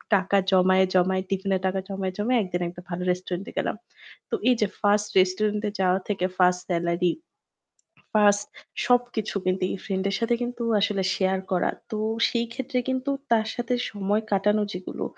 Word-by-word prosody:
টাকা 195 Hz, +1 st, +2 dB
জমায়ে, 185 Hz, 0 st, +5 dB
জমায়ে 185 Hz, +1 st, +3 dB
টিফিনের 195 Hz, -1 st, 0 dB
টাকা 190 Hz, +1 st, -1 dB
জমায়ে, 190 Hz, -1 st, -3 dB
জমায়ে 235 Hz, +4 st, +2 dB
একদিন 180 Hz, -1 st, -3 dB
একটা 180 Hz, 0 st, -10 dB
ভালো 180 Hz, +1 st, -3 dB
রেস্টুরেন্টে 180 Hz, +1 st, -4 dB
গেলাম। -, -, 0 dB, 0.5 s
তো -, -, 0 dB
এইযে 225 Hz, -4 st, +3 dB
1st 205 Hz, 0 st, +3 dB
রেস্টুরেন্টে 210 Hz, +3 st, +1 dB
যাওয়া 185 Hz, 0 st, +3 dB
থেকে 195 Hz, -3 st, 0 dB
1st 180 Hz, -1 st, +4 dB
সেলারি 170 Hz, 0 st, +1 dB, 1.0 s
1st 205 Hz, -1 st, +4 dB, 0.4 s
সবকিছু 245 Hz, -4 st, +1 dB
কিন্তু 185 Hz, 0 st, 0 dB
এই -, -, -3 dB
ফ্রেন্ডের 195 Hz, 0 st, -1 dB
সাথে 235 Hz, +1 st, +2 dB
কিন্তু 240 Hz, 0 st, -4 dB, 0.2 s
আসলে 200 Hz, -1 st, +1 dB
শেয়ার 190 Hz, 0 st, +1 dB
করা। 180 Hz, -, +2 dB, 0.2 s
তো 215 Hz, -, -3 dB, 0.3 s
সেইক্ষেত্রে 240 Hz, +2 st, -2 dB
কিন্তু 260 Hz, +2 st, -1 dB, 0.2 s
তার 220 Hz, -1 st, +3 dB
সাথে 240 Hz, +1 st, -1 dB, 0.2 s
সময় 205 Hz, +1 st, 0 dB
কাটানো 210 Hz, +2 st, +3 dB
যেগুলো 180 Hz, 0 st, -5 dB
195 Hz, 150 wpm, -25 LUFS, 185-215 Hz, 1.0 s, জমায়ে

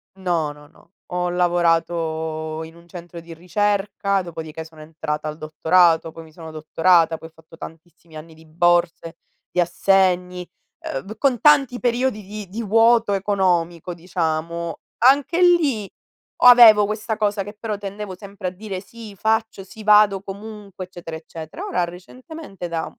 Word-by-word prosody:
No, 175 Hz, -5 st, -1 dB
no, 145 Hz, 0 st, -15 dB
no. -, -, -24 dB, 0.2 s
Ho 180 Hz, 0 st, -1 dB
lavorato 165 Hz, -2 st, -1 dB
in 160 Hz, +1 st, -12 dB
un 170 Hz, 0 st, -18 dB
centro 175 Hz, 0 st, -10 dB
di 165 Hz, 0 st, -11 dB
ricerca, 200 Hz, +2 st, -1 dB
dopodiché 160 Hz, -2 st, -8 dB
sono 160 Hz, -1 st, -15 dB
entrata 155 Hz, -1 st, -5 dB
al 155 Hz, 0 st, -5 dB
dottorato, 165 Hz, +1 st, +2 dB
poi 165 Hz, -, -11 dB
mi 160 Hz, -, -17 dB
sono 160 Hz, 0 st, -10 dB
dottorata, 165 Hz, +1 st, +2 dB
poi 160 Hz, -, -11 dB
ho -, -, -32 dB
fatto 160 Hz, 0 st, -18 dB
tantissimi 165 Hz, 0 st, -13 dB
anni 160 Hz, +1 st, -11 dB
di 160 Hz, 0 st, -18 dB
borse, 170 Hz, 0 st, 0 dB, 0.3 s
di -, -, -3 dB
assegni, 180 Hz, 0 st, +1 dB, 0.6 s
uhm, 215 Hz, +2 st, -10 dB
con 260 Hz, -3 st, +1 dB
tanti 275 Hz, -4 st, +4 dB
periodi 245 Hz, -2 st, 0 dB
di 205 Hz, -1 st, -9 dB
di 225 Hz, +4 st, -5 dB
vuoto 225 Hz, 0 st, +3 dB
economico 180 Hz, -4 st, 0 dB
diciamo. 170 Hz, -1 st, -3 dB, 0.3 s
Anche 285 Hz, +6 st, +4 dB
lì, 300 Hz, -, +3 dB, 0.5 s
avevo 235 Hz, -4 st, +8 dB
questa 215 Hz, +2 st, -3 dB
cosa 205 Hz, -2 st, -1 dB
che 205 Hz, +2 st, -9 dB
però 215 Hz, -1 st, -4 dB
tendevo 200 Hz, -1 st, -7 dB
sempre 200 Hz, -1 st, -7 dB
a -, -, -2 dB
dire: 190 Hz, 0 st, -7 dB
"Sì 220 Hz, -1 st, -12 dB
faccio, 220 Hz, 0 st, -1 dB
sì 215 Hz, +3 st, -13 dB
vado 210 Hz, -2 st, +5 dB
comunque, 200 Hz, -1 st, -9 dB
eccetera 175 Hz, -3 st, -9 dB
eccetera." 160 Hz, 0 st, -9 dB
Ora 180 Hz, -, -1 dB
recentemente 195 Hz, -, -10 dB
da 165 Hz, -1 st, -3 dB
180 Hz, 150 wpm, -21 LUFS, 165-210 Hz, 0.6 s, avevo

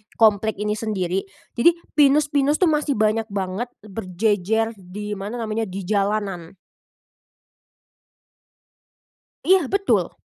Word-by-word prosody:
komplek 220 Hz, -1 st, +3 dB
ini 210 Hz, 0 st, 0 dB
sendiri. 195 Hz, -4 st, -2 dB, 0.3 s
Jadi 335 Hz, +8 st, +5 dB, 0.2 s
pinus-pinus 290 Hz, 0 st, +4 dB
tuh 360 Hz, -, +5 dB
masih 300 Hz, -2 st, 0 dB
banyak 215 Hz, +1 st, +1 dB
banget 200 Hz, +3 st, -3 dB, 0.2 s
berjejer 210 Hz, +2 st, 0 dB
di 205 Hz, +2 st, -6 dB
mana 205 Hz, +5 st, -5 dB
namanya, 220 Hz, 0 st, -2 dB
di 190 Hz, +1 st, -6 dB
jalanan. 195 Hz, -3 st, -1 dB, 2.9 s
Iya 370 Hz, -6 st, +4 dB
betul. 395 Hz, 0 st, +1 dB
215 Hz, 100 wpm, -22 LUFS, 195-240 Hz, 2.9 s, Jadi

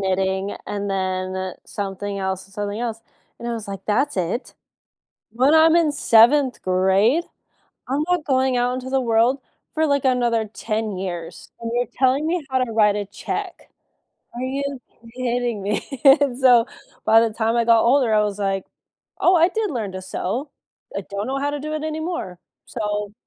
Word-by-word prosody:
knitting 190 Hz, +1 st, -1 dB
and 205 Hz, 0 st, -3 dB
then 185 Hz, 0 st, -2 dB
something 200 Hz, 0 st, -4 dB
else 190 Hz, 0 st, -3 dB
and 195 Hz, -, -20 dB
something 205 Hz, +1 st, -3 dB
else." 230 Hz, -2 st, -4 dB, 0.4 s
And 235 Hz, -, -7 dB
I -, -, -2 dB
was 225 Hz, -3 st, -6 dB
like, 195 Hz, -1 st, -7 dB
"That's 230 Hz, +4 st, 0 dB
it? 185 Hz, +8 st, -2 dB, 0.8 s
When 260 Hz, +6 st, +3 dB
I'm 320 Hz, +1 st, +6 dB
in 325 Hz, -3 st, +3 dB
7th 255 Hz, +2 st, +4 dB
grade? 190 Hz, -, +2 dB, 0.6 s
I'm 280 Hz, +3 st, 0 dB
not 355 Hz, -4 st, +1 dB
going 260 Hz, -2 st, +1 dB
out 245 Hz, +1 st, +1 dB
into 255 Hz, 0 st, -5 dB
the 270 Hz, 0 st, +2 dB
world 235 Hz, +3 st, +2 dB, 0.3 s
for, 315 Hz, 0 st, +1 dB
like, 280 Hz, -2 st, +1 dB
another 240 Hz, -3 st, +2 dB
10 215 Hz, -1 st, -3 dB
years, 175 Hz, -3 st, -6 dB
and 230 Hz, -, -4 dB
you're 245 Hz, -1 st, +1 dB
telling 265 Hz, +3 st, +2 dB
me 335 Hz, -2 st, -1 dB
how 260 Hz, -, +2 dB
to 250 Hz, -2 st, -1 dB
write 210 Hz, -2 st, +4 dB
a 205 Hz, -1 st, -3 dB
check. -, -, -6 dB, 0.7 s
Are 245 Hz, -, -5 dB
you 275 Hz, 0 st, -3 dB, 0.3 s
kidding 245 Hz, -4 st, -1 dB
me?" 205 Hz, +1 st, -1 dB, 0.2 s
And 275 Hz, -2 st, +5 dB
so, 250 Hz, -3 st, +5 dB, 0.4 s
by 225 Hz, +1 st, +6 dB
the 225 Hz, -2 st, 0 dB
time 225 Hz, +1 st, 0 dB
I 235 Hz, -, +3 dB
got 230 Hz, -1 st, +5 dB
older, 245 Hz, -2 st, +3 dB
I 210 Hz, -, +4 dB
was 205 Hz, -1 st, -2 dB
like, 195 Hz, -1 st, -1 dB, 0.6 s
"Oh, 365 Hz, -, +5 dB
I 340 Hz, 0 st, +5 dB
did 435 Hz, 0 st, -2 dB
learn 220 Hz, -7 st, -4 dB
to 185 Hz, -, -5 dB
sew." 215 Hz, +9 st, -3 dB, 0.5 s
I -, -, -1 dB
don't 200 Hz, +1 st, -3 dB
know 270 Hz, -, -2 dB
how 285 Hz, +1 st, -1 dB
to 290 Hz, -, -3 dB
do 305 Hz, -, -5 dB
it 310 Hz, 0 st, -3 dB
anymore. 315 Hz, -, -4 dB, 0.3 s
So 210 Hz, -2 st, -3 dB
230 Hz, 180 wpm, -22 LUFS, 200-270 Hz, 0.8 s, I'm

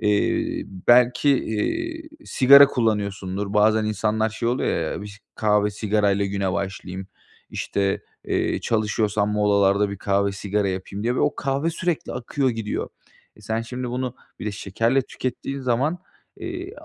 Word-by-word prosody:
Eee, 105 Hz, -2 st, +1 dB, 0.3 s
belki, 125 Hz, +3 st, +5 dB
eee, 320 Hz, -, -1 dB, 0.2 s
sigara 140 Hz, +2 st, +8 dB
kullanıyorsundur. 100 Hz, -5 st, -1 dB
Bazen 110 Hz, +1 st, +4 dB
insanlar 110 Hz, +1 st, 0 dB
şey 115 Hz, +2 st, -2 dB
oluyor 85 Hz, -10 st, 0 dB
ya, -, -, -5 dB
biş 105 Hz, 0 st, -10 dB
kahve 105 Hz, -1 st, +2 dB
sigarayla 100 Hz, -1 st, +1 dB
güne 100 Hz, -1 st, -1 dB
başlayayım, 95 Hz, 0 st, -4 dB, 0.4 s
işte, 100 Hz, -1 st, -1 dB, 0.2 s
eee, -, -, 0 dB
çalışıyorsam 105 Hz, -2 st, 0 dB
molalarda 100 Hz, -1 st, +3 dB
bir 100 Hz, -, -5 dB
kahve 100 Hz, 0 st, +1 dB
sigara 100 Hz, 0 st, -1 dB
yapayım 95 Hz, +2 st, -5 dB
diye 120 Hz, +2 st, 0 dB
ve -, -, 0 dB
o 150 Hz, -, +2 dB
kahve 140 Hz, +4 st, -1 dB
sürekli 170 Hz, -1 st, -2 dB
akıyor 130 Hz, +2 st, -1 dB
gidiyor. 115 Hz, -2 st, -3 dB, 0.5 s
E, -, -, -17 dB
sen 110 Hz, +2 st, -2 dB
şimdi 125 Hz, +2 st, -5 dB
bunu 125 Hz, 0 st, -3 dB, 0.2 s
bir -, -, -6 dB
de 105 Hz, -, -2 dB
şekerle 115 Hz, +6 st, 0 dB
tükettiğin 130 Hz, +2 st, -5 dB
zaman, 130 Hz, +7 st, 0 dB, 0.4 s
eee, 360 Hz, +2 st, -6 dB
110 Hz, 140 wpm, -23 LUFS, 100-125 Hz, 0.5 s, sigara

